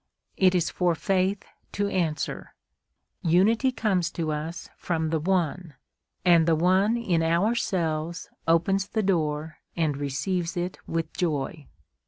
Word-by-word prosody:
It 185 -1 +4
is 175 -2 +1
for 175 -2 +1
faith 190 +4 0 0.3
to 205 0 0
answer, 165 -7 -2 0.7
"Unity 210 +10 +3
comes 210 -7 0
to 160 -2 -2
us 155 +3 -4
from 160 -2 -2
the 160 - +1
One, 175 -2 -1 0.5
and 170 -2 +5
the 165 - +4
One 190 +7 +3
in 185 -8 +1
ourselves 170 -2 0 0.2
opens 190 +4 +2
the 220 0 -1
door 160 -4 -1 0.2
and 155 -4 +1
receives 165 +6 -2
it 175 +1 -3
with 165 -1 -2
joy." 155 -3 -2
170 Hz, 130 wpm, -26 LUFS, 160-190 Hz, 0.7 s, and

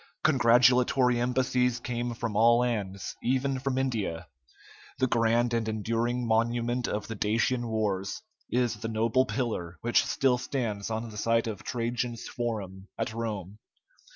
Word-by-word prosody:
Congratulatory 125 -2 +4
embassies 125 0 +1
came 120 0 -3
from 115 -2 -3
all 115 +2 +6
lands, 100 -6 -2
even 130 +1 0
from 135 -1 -2
India. 110 -11 -1 0.7
The 130 - +2
grand 115 0 +2
and 115 -1 0
enduring 115 +3 -1
monument 120 +2 +1
of 105 0 -3
the 115 - -4
Dacian 115 +4 0
wars 105 - -2 0.3
is 120 -3 +1
the 115 +2 -5
noble 115 +4 +1
pillar 100 -12 -3
which 120 +1 +3
still 130 -3 +1
stands 115 -6 -3
on 110 +1 -3
the 105 - -9
site 115 +2 +2
of 110 -4 -5
Trajan's 120 -1 -3
forum 100 -5 -4
at 115 -1 -2
Rome. 105 -3 -4
115 Hz, 140 wpm, -28 LUFS, 110-125 Hz, 0.7 s, all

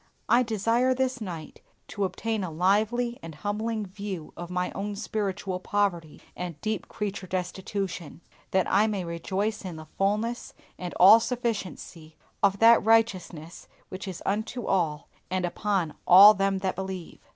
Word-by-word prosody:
I 240 - +5
desire 230 +3 +1
this 255 -1 -1
night 170 -6 -7 0.3
to 200 -2 -1
obtain 220 +2 -2
a 180 - -3
lively 215 +8 +1
and 165 -1 -9
humbling 215 +4 -3
view 195 -4 -7
of 175 0 -7
my 180 0 -2
own 205 +1 -4
spiritual 200 -3 -3
poverty 180 -5 -1 0.2
and 175 -3 -6
deep 215 -1 -3
creature 200 -2 -5
destitution, 185 -2 -4 0.3
that 190 -1 +2
I 205 +3 +3
may 200 -4 -2
rejoice 195 +6 -3
in 180 -3 -6
the 155 0 -9
fullness 215 +5 -1 0.2
and 180 -1 -6
all 205 +5 +8
sufficiency 215 -9 -4 0.3
of 200 -1 +3
that 230 +2 +6
righteousness 190 -7 0 0.2
which 190 +2 -7
is 185 -3 -7
unto 220 +4 -2
all 165 -5 0 0.2
and 185 -1 -1
upon 180 -3 -1
all 200 +4 +10
them 195 -1 0
that 190 0 -2
believe. 190 -3 -6
195 Hz, 150 wpm, -27 LUFS, 180-215 Hz, 0.3 s, all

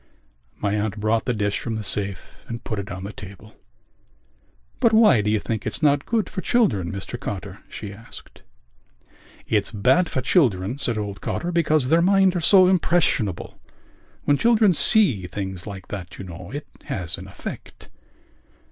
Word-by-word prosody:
My 100 -1 -1
aunt 105 0 -2
brought 110 +2 +1
the 125 - +1
dish 105 -1 -1
from 115 -2 -4
the 110 - -4
safe 100 -3 -2
and 115 0 -6
put 110 - -3
it 100 - -6
on 95 +1 -6
the 100 +2 -6
table. 100 +2 -12 1.2
"But 230 -3 +3
why 215 - +6
do 105 - -1
you 110 - +2
think 110 0 -3
it's - - -3
not 145 -1 +3
good 225 -3 0
for 185 - -5
children, 115 - +1
Mr 100 +5 -6
Cotter?" 100 -1 -6
she 105 -2 -7
asked. 110 +3 -13 1.1
"It's 105 -3 +1
bad 130 - +2
for 130 - -2
children," 120 - +1
said 120 -5 0
old 100 -2 -5
Cotter, 175 - -3
"because 155 -6 +2
their 165 +2 +4
minds 190 0 +4
are - - +1
so 185 +2 +6
impressionable. 165 - 0 0.6
When 145 - +3
children 225 -4 +4
see 140 - +4
things 95 -1 -5
like 95 -3 -8
that, 95 -3 -7
you - - -7
know, 85 0 -9
it 145 +2 -6 0.2
has 90 -3 -4
an - - -10
effect...." - - -9
110 Hz, 170 wpm, -23 LUFS, 100-165 Hz, 1.2 s, why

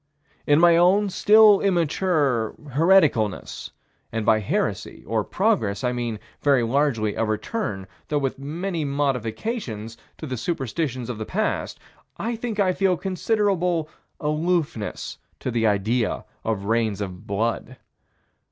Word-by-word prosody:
In 145 +1 +5
my 170 0 +6
own 190 +4 +4
still 210 0 +6
immature 160 - +1 0.2
hereticalness 150 - +2 0.4
and 115 -1 -2
by 110 0 +4
heresy, 105 - -2
or - - 0
progress, 100 +2 0
I 125 - +1
mean, 120 -3 -3 0.2
very 140 -4 +3
largely, 115 -4 +1
a 115 - -1
return, 110 - -3 0.2
though 150 - 0
with 135 -2 -2
many 165 +4 -3
modifications, 125 - -2 0.2
to - - -7
the 130 -3 -4
superstitions 135 -4 -3
of 120 -3 -5
the 110 - -3
past, 215 +3 -2 0.4
I 235 +1 -2
think 225 -2 -4
I 185 -2 +3
feel 185 0 +2
considerable 185 -3 0 0.3
aloofness 150 -6 -2 0.2
to 130 - -3
the 115 -1 +1
idea 110 +3 0 0.2
of 105 -3 -2
rains 110 -2 0
of 95 0 -6
blood. 115 +5 -2
140 Hz, 130 wpm, -24 LUFS, 115-180 Hz, 0.4 s, my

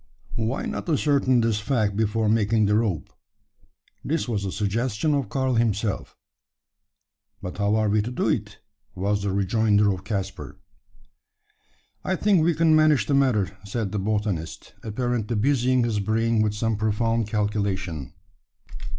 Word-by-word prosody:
"Why 115 +3 -2
not - - -4
ascertain 140 -5 +2
this 115 -2 +1
fact 105 -3 0
before 110 +1 0
making 110 0 +2
the 105 - +2
rope?" 105 -8 -1 0.9
This 160 -1 -1
was 105 -4 -2
a 95 - -3
suggestion 115 - -1
of 140 -7 -1
Karl 130 +2 0
himself. 110 -3 -1 1.2
"But 90 -2 -7
how 100 +1 +2
are 110 -1 +2
we 105 +1 +2
to 110 - -4
do 125 - -1
it?" - - -2 0.4
was 100 +2 0
the 100 -1 -1
rejoinder 105 +1 +2
of 95 0 -8
Caspar. 95 -2 -5 1.5
"I 190 - 0
think 195 -2 +3
we 170 0 +2
can 160 0 +4
manage 155 -2 +4
the 145 - -1
matter," 120 -10 +2
said 100 0 -3
the 105 - -2
botanist, 105 -5 -3
apparently 120 0 -2
busying 130 +2 +2
his 115 -3 0
brain 110 +2 +1
with 105 -1 0
some 115 0 -1
profound 110 +1 0
calculation. 100 - -2
110 Hz, 145 wpm, -24 LUFS, 100-120 Hz, 1.5 s, can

